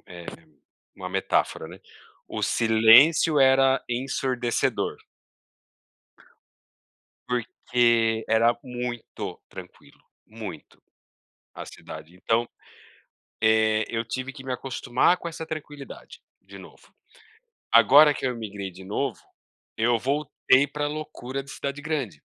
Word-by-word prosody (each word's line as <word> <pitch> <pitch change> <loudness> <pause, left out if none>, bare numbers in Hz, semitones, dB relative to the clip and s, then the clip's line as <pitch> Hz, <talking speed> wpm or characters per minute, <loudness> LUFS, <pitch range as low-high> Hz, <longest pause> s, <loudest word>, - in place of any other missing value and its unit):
é 90 -1 -11
é - - -13 0.7
uma - - -6
metáfora, - - -1
né, - - -12 0.5
o - - -5
silêncio 115 +8 +5
era 135 0 +4
ensurdecedor. 125 -1 -1 2.3
Porque 115 -2 +1
era 115 +1 +3
muito 125 -2 -6
tranquilo, - - -13 0.3
muito, 110 -8 -10 0.7
a - - -8
cidade 80 +3 -11
então, 115 +5 0 0.9
eh, 110 -1 +3
eu 115 0 -2
tive 130 +3 -5
que 135 -2 -12
me 130 - -5
acostumar 130 +5 +1
com 170 - -7
essa 165 -1 -6
tranquilidade 150 -3 -9 0.2
de - - -13
novo. - - -16 0.8
Agora 140 +7 +7
que 135 - -5
eu 125 - 0
imigrei 100 -4 -6
de 95 +2 -13
novo, 105 - -3 0.6
eu 115 +1 +2
voltei 140 +1 +1
para 145 +1 -3
loucura 145 -3 -6
de 140 - -16
cidade 140 +1 -5
grande. 140 - -4
125 Hz, 110 wpm, -25 LUFS, 110-140 Hz, 2.3 s, Agora